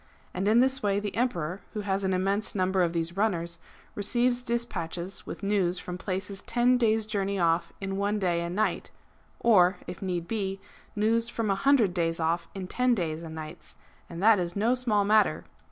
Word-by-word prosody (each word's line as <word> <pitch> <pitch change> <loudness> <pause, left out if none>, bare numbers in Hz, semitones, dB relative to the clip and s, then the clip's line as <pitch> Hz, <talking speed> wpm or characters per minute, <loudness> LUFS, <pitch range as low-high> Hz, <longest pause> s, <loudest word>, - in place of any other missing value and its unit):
And 190 +2 -1
in 225 +3 +5
this 265 +1 +2
way 200 -1 +1
the 205 -1 -4
Emperor, 185 -7 -1
who 210 - -3
has 195 -1 -1
an 190 - +1
immense 195 +4 0
number 185 0 +1
of 170 -2 +2
these 170 0 -2
runners, 170 -5 -1 0.3
receives 240 +4 +1
despatches 195 -7 -3
with - - -7
news 195 -3 +1
from 180 0 -6
places 195 +1 -4
ten 245 +1 +2
days' 220 -2 +2
journey 200 -2 -1
off 170 -1 +1
in 195 0 -3
one 205 +1 0
day 175 -4 0
and 170 +1 -4
night; 215 +1 0 0.5
or, 190 -5 +5
if 175 - -8
need 175 -3 -3
be, 195 -3 -2 0.4
news 225 +2 +1
from 225 -3 -1
a - - +4
hundred 235 -4 +3
days 165 -2 0
off 165 +1 0
in 190 -1 -4
ten 250 +6 +1
days 165 -5 -2
and 160 -1 -8
nights; 155 -1 -9 0.3
and 170 +2 -6
that 220 -2 +6
is 175 -1 -3
no 220 +4 +2
small 225 -5 +1
matter! 215 +1 +3
195 Hz, 190 wpm, -28 LUFS, 175-220 Hz, 0.5 s, that